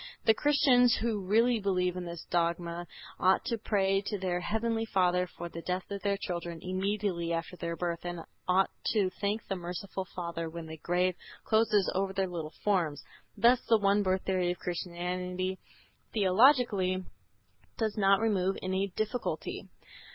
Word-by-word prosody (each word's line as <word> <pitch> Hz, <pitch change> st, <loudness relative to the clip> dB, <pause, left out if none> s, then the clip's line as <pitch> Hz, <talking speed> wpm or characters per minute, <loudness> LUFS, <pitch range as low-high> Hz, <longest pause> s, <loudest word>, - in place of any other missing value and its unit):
The 220 Hz, -, +7 dB
Christians 255 Hz, -3 st, +4 dB
who 220 Hz, -3 st, -1 dB
really 225 Hz, +5 st, +3 dB
believe 180 Hz, -3 st, 0 dB
in 180 Hz, -1 st, -4 dB
this 170 Hz, -1 st, -7 dB
dogma 170 Hz, 0 st, 0 dB, 0.3 s
ought 185 Hz, +1 st, +3 dB
to 230 Hz, -, -1 dB
pray 195 Hz, -2 st, +1 dB
to 205 Hz, -, -1 dB
their 180 Hz, -2 st, -1 dB
heavenly 225 Hz, +4 st, -1 dB
Father 180 Hz, -4 st, +2 dB
for 175 Hz, -, -7 dB
the 170 Hz, 0 st, -7 dB
death 180 Hz, +3 st, -3 dB
of 200 Hz, -1 st, -4 dB
their 200 Hz, -1 st, 0 dB
children 170 Hz, -3 st, -4 dB
immediately 185 Hz, -2 st, -1 dB
after 165 Hz, +1 st, -3 dB
their 170 Hz, -1 st, -4 dB
birth 170 Hz, -1 st, -3 dB
and 175 Hz, -1 st, -4 dB, 0.3 s
ought 185 Hz, +1 st, +3 dB, 0.2 s
to 200 Hz, -4 st, +2 dB
thank 210 Hz, +2 st, -1 dB
the 195 Hz, -, -1 dB
merciful 180 Hz, +2 st, -5 dB
Father 170 Hz, -2 st, -3 dB
when 165 Hz, 0 st, -7 dB
the 160 Hz, 0 st, -8 dB
grave 180 Hz, +2 st, +1 dB, 0.3 s
closes 220 Hz, -3 st, +3 dB
over 190 Hz, 0 st, 0 dB
their 195 Hz, 0 st, +1 dB
little 165 Hz, -4 st, -6 dB
forms. 170 Hz, -8 st, +1 dB, 0.3 s
Thus 240 Hz, +1 st, +5 dB
the 225 Hz, -, +7 dB
one 200 Hz, 0 st, +3 dB
birth 190 Hz, -1 st, +1 dB
theory 185 Hz, -2 st, +1 dB
of 175 Hz, -, -1 dB
Christian 180 Hz, +1 st, -4 dB, 0.7 s
theology 200 Hz, -3 st, +4 dB, 0.7 s
does 220 Hz, -3 st, -1 dB
not 195 Hz, -1 st, +4 dB
remove 195 Hz, -4 st, +1 dB
any 190 Hz, +1 st, 0 dB
difficulty. 215 Hz, +3 st, -3 dB
185 Hz, 160 wpm, -30 LUFS, 175-210 Hz, 0.7 s, The